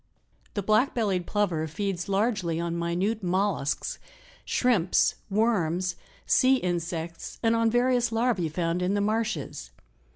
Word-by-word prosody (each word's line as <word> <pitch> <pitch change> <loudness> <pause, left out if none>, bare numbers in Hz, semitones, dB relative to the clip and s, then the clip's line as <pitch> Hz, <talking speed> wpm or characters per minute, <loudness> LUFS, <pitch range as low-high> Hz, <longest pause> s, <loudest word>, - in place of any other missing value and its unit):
The 205 - -1
Black 215 +7 +2
bellied 195 -7 0
Plover 180 -7 0
feeds 190 +2 -3
largely 195 -5 0
on 170 0 -2
minute 180 +6 -1
mollusks, 185 -5 -1 0.4
shrimps, 215 -9 +2 0.2
worms, 185 -5 +1 0.3
sea 260 +1 +4
insects 170 -5 -3
and 225 0 +3
on 230 0 +3
various 245 0 +2
larvae 225 -7 +1
found 170 +2 -1
in 185 +3 +1
the - - +1
marshes. 210 - -2
195 Hz, 125 wpm, -27 LUFS, 170-225 Hz, 0.4 s, sea